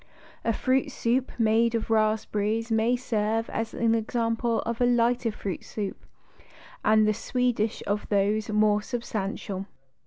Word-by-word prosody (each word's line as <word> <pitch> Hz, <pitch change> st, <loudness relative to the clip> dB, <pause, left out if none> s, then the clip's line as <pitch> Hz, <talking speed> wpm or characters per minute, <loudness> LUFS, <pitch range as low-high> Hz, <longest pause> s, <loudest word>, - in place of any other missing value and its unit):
A 230 Hz, -, +2 dB
fruit 260 Hz, +4 st, +1 dB
soup 245 Hz, +2 st, 0 dB
made 230 Hz, +1 st, +3 dB
of 225 Hz, 0 st, -2 dB
raspberries 215 Hz, +1 st, +1 dB
may 225 Hz, +2 st, +3 dB
serve 225 Hz, -2 st, -1 dB
as 225 Hz, 0 st, -3 dB
example 230 Hz, 0 st, +1 dB
of 235 Hz, +1 st, -4 dB
a -, -, +5 dB
lighter 240 Hz, -1 st, +2 dB
fruit 200 Hz, -3 st, -5 dB
soup 205 Hz, -3 st, -6 dB, 0.8 s
and 215 Hz, 0 st, +4 dB
the 215 Hz, -, +3 dB
Swedish 235 Hz, -1 st, -1 dB
of 205 Hz, +1 st, -2 dB
those 205 Hz, +1 st, +1 dB
more 210 Hz, 0 st, +3 dB
substantial. 205 Hz, -4 st, -4 dB
225 Hz, 130 wpm, -27 LUFS, 215-235 Hz, 0.8 s, a